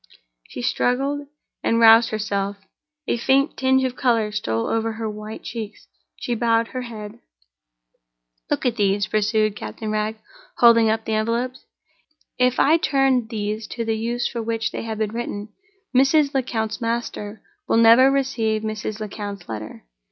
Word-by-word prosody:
She 245 - -7
struggled, 275 +4 0 0.4
and 230 - +2
roused 225 0 +7
herself—a 215 +8 -4
faint 270 +4 +2
tinge 265 0 +2
of 255 -1 -2
color 230 -5 +1
stole 115 - -2
over 225 0 -1
her 220 0 -4
white 215 +1 -7
cheeks—she - - -7
bowed 230 0 +1
her 255 - -4
head. 215 -4 -8 1.3
"Look - - -1
at 245 -1 +1
these," 200 -1 +2
pursued 215 0 +1
Captain 110 - -6
Wragge, 215 +1 -1 0.4
holding 230 -2 +6
up 220 0 -1
the 220 - -2
envelopes. 230 +4 -1 0.7
"If 250 0 +2
I 310 +4 +5
turn 270 -7 +2
these 215 -1 -4
to 230 -1 -4
the 225 0 0
use 235 +2 -1
for 235 - -4
which 225 0 -2
they - - -4
have 225 -1 -5
been 215 -1 -1
written, 220 -3 -4 0.5
Mrs. 280 +2 +4
Lecount's 230 -4 -2
master 230 -2 -3 0.2
will - - +2
never 230 +3 +7
receive 230 -6 0
Mrs. 215 0 -4
Lecount's 205 -2 -6
letter. 110 -1 -7
225 Hz, 145 wpm, -22 LUFS, 215-245 Hz, 1.3 s, roused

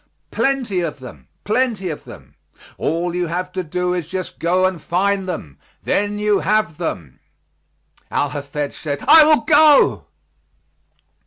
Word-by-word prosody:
"Plenty 255 -9 0
of 165 -4 -3
them, 130 -2 -12 0.2
plenty 215 -5 -1
of 150 - -8
them; - - -13 0.5
all 170 +2 -1
you 175 0 -1
have 180 +2 -4
to 185 0 -3
do 180 +2 -2
is 175 -4 -3
just 185 0 -6
go 180 +2 +2
and 185 -4 -2
find 190 +3 0
them, 80 - -6 0.2
then 205 +1 0
you 210 -1 +1
have 210 -7 0
them." 85 - -5 0.9
Al 145 - 0
Hafed 145 0 -5
said, 145 -2 -5
"I 320 - +9
will 305 -4 +4
go." 300 +2 +4
180 Hz, 145 wpm, -19 LUFS, 160-205 Hz, 0.9 s, I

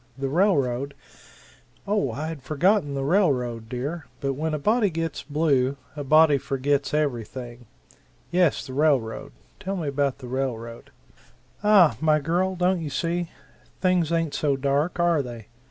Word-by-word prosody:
The 135 0 -2
railroad 140 -6 +1 0.5
" - - -28
"Oh, 200 - +1
I 150 +6 -4
had 160 -4 -7
forgotten 155 - +1
the 135 - -2
railroad, 125 - +1
dear, 140 +6 -4
but 140 -1 -1
when 155 +3 -2
a - - -1
body 215 +7 +2
gets 165 -2 -3
blue, 140 -3 +1 0.2
a 145 - -4
body 150 0 +5
forgets 140 +1 -1
everything. 120 -4 -3 0.6
Yes, 175 -3 +2
the 130 - -8
railroad 135 -6 +1 0.3
tell 195 +1 -3
me 165 -4 -3
about 140 -1 0
the 130 -2 -10
railroad." 120 -3 -4 0.7
"Aha, 190 - +5
my 155 -1 +4
girl, 175 +5 0
don't 180 0 +1
you 155 - -4
see? 170 +3 -2 0.5
Things 180 -3 +2
ain't 165 -3 0
so 145 -2 +1
dark, 140 +6 0
are 170 -3 +3
they? 120 -4 -9
145 Hz, 155 wpm, -25 LUFS, 135-170 Hz, 0.7 s, body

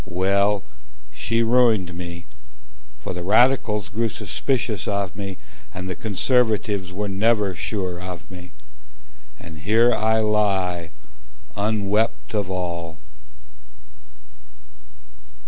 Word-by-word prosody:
Well, 100 +2 +2 0.5
she 115 0 0
ruined 115 -7 +3
me: 85 -1 -7 0.8
For - - -4
the 90 - -5
radicals 105 0 +3
grew 110 +6 -1
suspicious 120 -2 -2
of 100 -3 -1
me, 100 -2 -5 0.4
And 90 0 -5
the 95 - -2
conservatives 105 -3 +1
were 105 +3 -3
never 105 0 +2
sure 90 +1 -3
of 90 +1 -8
me— 90 -1 -10 0.9
And 80 -3 -11
here 115 +8 +4
I 110 +1 +2
lie, 95 -5 +1 0.7
unwept 105 -5 0
of 105 -3 -1
all. 85 -3 -4
100 Hz, 100 wpm, -23 LUFS, 90-110 Hz, 0.9 s, here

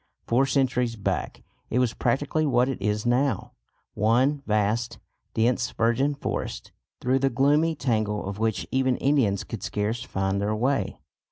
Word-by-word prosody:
Four 130 +4 +2
centuries 125 -4 +1
back 100 - -3 0.3
it - - -1
was 125 -3 +2
practically 145 +7 0
what 125 -2 +3
it 135 -6 -3
is 105 +2 -1
now 125 0 +1 0.4
one 125 +7 +2
vast 110 +2 0 0.4
dense 120 +1 +2
virgin 120 +6 +1
forest, - - -4 0.3
through 130 +2 +1
the 135 0 +2
gloomy 145 +6 +2
tangle 110 -6 -1
of 100 +1 -5
which 110 -2 0
even 130 -1 +2
Indians 130 -9 +2
could 115 - -7
scarce 110 +3 -2
find 95 -4 -1
their 105 +1 0
way. 130 +5 0
120 Hz, 150 wpm, -26 LUFS, 110-135 Hz, 0.4 s, what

